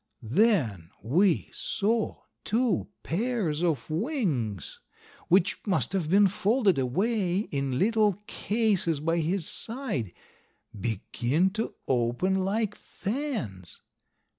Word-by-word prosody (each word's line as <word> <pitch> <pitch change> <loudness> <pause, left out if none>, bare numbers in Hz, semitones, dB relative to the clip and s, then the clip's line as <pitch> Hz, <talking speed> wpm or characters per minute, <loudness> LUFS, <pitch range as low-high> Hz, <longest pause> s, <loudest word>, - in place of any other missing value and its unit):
Then 120 - +2
we 170 - +2
saw 220 +2 -1 0.2
two 235 +1 +1 0.2
pairs 185 -5 -1
of 165 -5 0
wings, 160 - -2 0.5
which 185 +1 +3
must 195 -1 +1
have 175 -6 -1
been 200 +3 +6
folded 200 - +2
away 185 - +1
in 140 - -2
little 215 - +3
cases 205 -10 +1
by 165 +3 0
his 165 +2 0
side, 225 - -2 0.6
begin 120 - 0
to 220 +3 -3
open 130 +11 +1
like 210 +2 0
fans. 200 - -5
185 Hz, 100 wpm, -28 LUFS, 140-215 Hz, 0.6 s, been